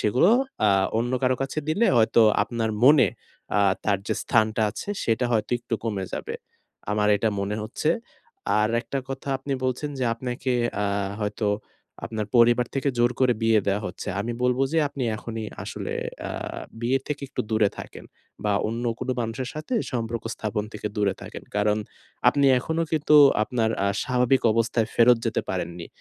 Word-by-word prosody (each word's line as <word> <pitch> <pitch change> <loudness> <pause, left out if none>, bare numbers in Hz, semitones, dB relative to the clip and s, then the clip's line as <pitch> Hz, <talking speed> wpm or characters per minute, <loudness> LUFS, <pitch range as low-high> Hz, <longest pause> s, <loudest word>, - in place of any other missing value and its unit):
সেগুলো 125 - +3 0.4
আ - - +5 0.3
অন্য 120 +2 -1
কারো 130 0 +2
কাছে 135 +3 -3
দিলে 205 +9 +2
হয়তো 115 +1 +4 0.2
আপনার 115 -2 -2
মনে 145 -1 +7 0.5
আ - - +4 0.2
তার 100 -2 +2
যে - - 0
স্থানটা 110 -1 +2
আছে 110 - -8 0.2
সেটা 115 +2 +1
হয়তো 110 -2 0
একটু 115 -1 -4
কমে 100 -4 -2
যাবে - - -4 0.6
আমার 105 0 +2
এটা 110 - +1
মনে 100 +2 -2
হচ্ছে। 130 +8 -1 0.7
আর 110 +1 +2
একটা 135 +2 -4
কথা 135 +1 -6
আপনি 140 +1 -4
বলছেন 130 +3 -1
যে 130 - 0
আপনাকে 125 +2 -3 0.3
আ - - +1 0.4
হয়তো 105 +1 -2 0.6
আপনার 110 -2 -3
পরিবার 120 +1 +5
থেকে 135 +1 0
জোর 120 0 +4
করে 130 -1 +5
বিয়ে 110 -2 +4
দেয়া 100 +1 +1
হচ্ছে। 90 - -7
আমি 120 +3 -3
বলব 125 0 +2
যে 165 - +3
আপনি 140 -1 -6
এখনই 115 0 -6 0.2
আসলে - - -5 0.4
আ - - -5 0.5
বিয়ে 125 +3 +2
থেকে 145 -1 -4
একটু - - -3
দূরে 110 -2 +3
থাকেন - - -9 0.4
বা 105 - +2 0.2
অন্য 115 +2 -3
কোনো 130 0 -2
মানুষের 120 +3 -3
সাথে 155 +11 -4 0.2
সম্পর্ক 115 -1 -3
স্থাপন 105 0 -3
থেকে 105 0 -5
দূরে 100 -2 +1
থাকেন - - -8
কারণ 105 +1 +2 0.5
আপনি 140 -1 +2
এখনো 160 +5 -1
কিন্তু 150 -1 +3 0.3
আপনার 110 -1 0
আ - - +2 0.2
স্বাভাবিক 125 +1 +2
অবস্থায় 115 0 +1
ফেরত 120 +1 +6
যেতে - - 0
পারেননি। 85 0 -4
115 Hz, 170 wpm, -25 LUFS, 110-130 Hz, 0.7 s, মনে